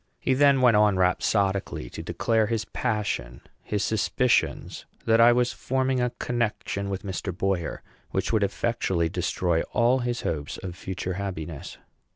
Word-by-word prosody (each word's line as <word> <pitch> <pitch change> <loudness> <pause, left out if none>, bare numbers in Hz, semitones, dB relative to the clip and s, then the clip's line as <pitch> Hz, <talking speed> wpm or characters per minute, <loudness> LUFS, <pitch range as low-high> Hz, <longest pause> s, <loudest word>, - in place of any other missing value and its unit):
He 130 - +1
then 140 0 +4
went 120 -3 +6
on 105 -2 +4
rhapsodically 95 - +1
to - - -6
declare 110 -2 +1
his 110 -1 -1
passion; 105 - -2 0.2
his 105 -2 -2
suspicions 120 +3 0 0.2
that 115 0 +4
I 120 +1 +8
was 125 0 +2
forming 130 0 0
a 125 - +1
connection 110 -4 -2
with 95 -1 -4
Mr. 95 -1 -3
Boyer, 95 -4 -1 0.3
which - - -1
would 110 - +3
effectually 95 -4 0
destroy 90 -1 0
all 120 +3 +3
his 120 -1 -2
hopes 75 -2 -3
of 90 -2 -5
future 95 0 -4
happiness. 85 -6 -5
105 Hz, 150 wpm, -26 LUFS, 95-120 Hz, 0.3 s, I